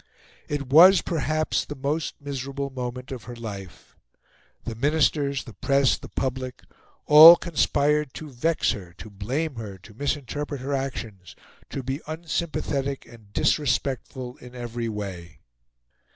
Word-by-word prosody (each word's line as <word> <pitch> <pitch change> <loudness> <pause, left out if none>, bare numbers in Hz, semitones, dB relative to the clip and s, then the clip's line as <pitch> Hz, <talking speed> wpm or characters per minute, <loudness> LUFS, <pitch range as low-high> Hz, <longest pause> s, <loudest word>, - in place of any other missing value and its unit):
It 145 -1 -3
was 175 +8 +8
perhaps 155 -1 0
the 145 - -8
most 145 +4 -2
miserable 140 -1 -5
moment 125 0 -6
of 130 -4 -7
her 120 0 -8
life. 100 -6 -9 0.7
The 115 - -4
Ministers, 140 0 +1
the 115 - -11
press, 140 +1 +2
the - - -11
public, 130 -1 -4 0.4
all 155 +3 +11
conspired 150 -4 +1
to 155 - -7
vex 150 +5 0
her, 90 -6 -7
to 110 - -10
blame 130 +9 -3
her, 105 -4 -7
to 100 +4 -16
misinterpret 145 +2 -3
her 140 +2 -3
actions, 115 -9 -5 0.3
to 135 - -5
be 135 +3 -3
unsympathetic 155 -4 -3
and 115 -4 -16
disrespectful 130 -1 -1
in 125 0 -13
every 120 -1 -4
way. 95 -6 -7
135 Hz, 135 wpm, -25 LUFS, 120-145 Hz, 0.7 s, all